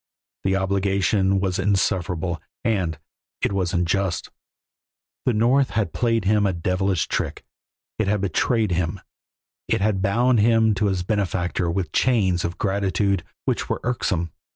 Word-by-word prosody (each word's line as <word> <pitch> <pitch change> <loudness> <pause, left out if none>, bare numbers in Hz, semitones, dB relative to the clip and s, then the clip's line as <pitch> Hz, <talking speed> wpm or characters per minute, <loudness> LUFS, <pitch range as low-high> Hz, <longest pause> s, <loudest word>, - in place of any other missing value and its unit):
The 95 0 +1
obligation 95 0 +1
was 95 -1 -1
insufferable, 90 -4 0 0.2
and 95 -9 0 0.4
it - - 0
was 95 -3 0
unjust. 90 -1 -1 1.0
The 125 - +4
North 125 +5 +3
had 105 -7 -1
played 115 -4 +1
him 105 0 +3
a 95 - 0
devilish 90 +1 0
trick, - - -3 0.5
it 110 - +1
had 105 0 +1
betrayed 105 +3 +1
him, 90 +2 -1 0.7
it - - +1
had 100 -2 +1
bound 120 +5 +3
him 110 0 +4
to 105 +1 0
his 95 -2 -1
benefactor 90 -3 -1
with 85 -2 -2
chains 95 -8 +2
of 85 +1 -3
gratitude 100 -1 0 0.2
which - - -1
were - - -1
irksome. 95 -9 -1
95 Hz, 140 wpm, -23 LUFS, 90-105 Hz, 1.0 s, The